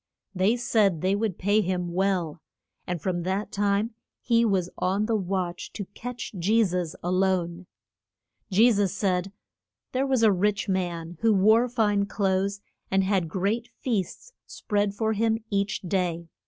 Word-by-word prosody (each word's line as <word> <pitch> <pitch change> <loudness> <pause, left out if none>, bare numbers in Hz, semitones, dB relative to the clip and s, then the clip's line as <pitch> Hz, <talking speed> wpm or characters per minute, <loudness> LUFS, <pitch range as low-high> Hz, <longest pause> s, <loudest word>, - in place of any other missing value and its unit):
They 195 +4 +2
said 210 -8 +2
they 185 +1 +2
would 205 -3 -1
pay 205 +3 +2
him 180 -2 -2
well. 180 -4 0 0.5
And 175 -1 -2
from 175 +2 -2
that 190 +4 -2
time 205 +3 0 0.3
he 235 -1 +3
was 195 -6 +1
on 195 +3 +1
the 225 0 0
watch 185 -3 -2
to 200 - -5
catch 245 0 -6
Je 215 +6 +3
sus 180 -4 -2
a 175 - -1
lone. 185 -2 0 0.8
Je 220 +5 +5
sus 200 -4 +1
said, 190 -2 -1 0.6
There 265 +2 0
was 260 -4 +2
a 220 - +6
rich 205 +3 0
man, 175 -3 -3
who 225 - +4
wore 220 +5 +4
fine 210 -4 +1
clothes, 195 0 0 0.3
and 195 0 +2
had 190 -4 0
great 200 +7 -1
feasts 240 - -3
spread 205 -1 -1
for 220 +1 0
him 225 +1 +1
each 200 +1 0
day. 175 -2 -2
195 Hz, 155 wpm, -26 LUFS, 180-215 Hz, 0.8 s, a